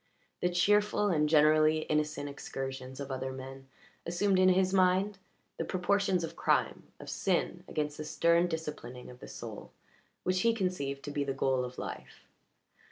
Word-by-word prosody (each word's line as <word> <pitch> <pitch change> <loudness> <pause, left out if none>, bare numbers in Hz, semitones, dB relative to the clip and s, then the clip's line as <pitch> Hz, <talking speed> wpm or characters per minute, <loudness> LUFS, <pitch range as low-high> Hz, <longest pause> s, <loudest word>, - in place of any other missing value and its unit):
The 180 - +2
cheerful 205 +3 +3
and 150 -4 +2
generally 155 0 +5
innocent 150 -1 -1
excursions 135 -2 -6
of 140 -1 -5
other 130 0 -3
men 135 0 -9 0.4
assumed 185 +3 +1
in 185 0 +6
his 185 +1 +3
mind 190 +1 +3 0.4
the - - -1
proportions 185 0 +1
of 165 - -5
crime, - - 0
of - - -10
sin - - -1
against 150 -1 -2
the 155 - -4
stern 170 +3 +3
disciplining 150 -7 -6
of 125 - -14
the - - -10
soul - - -8 0.5
which 185 0 +1
he 230 -1 +3
conceived 160 -9 -2
to 145 - -5
be 145 0 -1
the 140 -1 -2
goal 130 -1 +1
of 125 0 -7
life. - - -8
155 Hz, 165 wpm, -31 LUFS, 135-185 Hz, 0.5 s, in